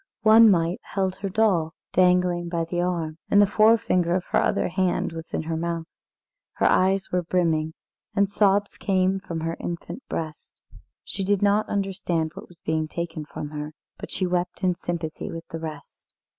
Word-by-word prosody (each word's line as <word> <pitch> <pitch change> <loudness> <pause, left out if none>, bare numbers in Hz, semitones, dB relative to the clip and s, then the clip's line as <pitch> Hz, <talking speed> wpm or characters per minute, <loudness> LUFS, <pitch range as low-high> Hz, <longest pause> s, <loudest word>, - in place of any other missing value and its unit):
One 220 +1 +8
mite 170 -1 +2
held 190 -2 -2
her 195 0 -3
doll, 185 -6 +2 0.2
dangling 180 -1 +3
by 170 -1 -1
the 175 +1 -2
arm, 170 -3 -2
and 205 - +5
the 205 - +7
forefinger 205 -5 +3
of 185 - 0
her - - +4
other - - +1
hand 185 -1 0
was 165 0 -8
in - - -2
her 165 +1 -3
mouth. 165 0 -2 0.7
Her - - 0
eyes 190 +1 +3
were 180 - +1
brimming, 165 -2 0 0.4
and 200 -1 +3
sobs 200 0 +2
came 190 0 +1
from 170 -4 -5
her 165 +1 -2
infant 175 +8 -5
breast. 155 -1 -6 0.4
She 195 - -4
did 200 +1 +1
not 205 +1 +3
understand 185 -5 -1
what - - -10
was 175 -2 -17
being 160 0 -1
taken 160 -1 -5
from 150 0 -6
her, 150 0 -6 0.3
but - - -7
she 185 - -1
wept 180 +2 -2
in 180 -1 +3
sympathy 170 -2 -4
with 165 0 -7
the 165 - -5
rest. 155 -3 -9
175 Hz, 180 wpm, -25 LUFS, 165-195 Hz, 0.7 s, One